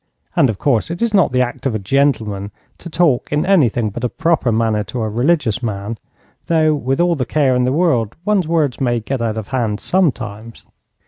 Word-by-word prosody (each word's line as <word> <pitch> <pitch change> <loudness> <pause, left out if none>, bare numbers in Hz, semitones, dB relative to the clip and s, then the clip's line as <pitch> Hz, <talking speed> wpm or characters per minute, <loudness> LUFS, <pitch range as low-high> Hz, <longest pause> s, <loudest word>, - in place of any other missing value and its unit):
And 135 - +4
of 110 - -2
course 125 +2 0
it 170 - -5
is 235 -2 0
not 195 -9 +4
the 125 0 +2
act 125 +2 -4
of 120 - -2
a - - +1
gentleman 105 -3 0 0.3
to 170 - -9
talk 160 -6 +1
in 150 0 +1
anything 120 - +2
but 120 +5 -7
a 125 - +1
proper 160 -6 0
manner 110 -1 +1
to 110 +4 -4
a - - -1
religious 125 +1 0
man, 110 -1 -4 0.5
though, 160 -2 +3
with 135 -2 -1
all 175 0 +3
the 135 - -1
care 135 -1 +1
in 125 0 +2
the 125 - +1
world, 130 - +1
one's 200 -5 +1
words 155 -6 0
may 120 -2 +1
get 125 +3 -4
out 110 -1 -1
of 110 -3 -6
hand 115 -5 -1
sometimes. 115 - -2
125 Hz, 210 wpm, -18 LUFS, 110-155 Hz, 0.5 s, And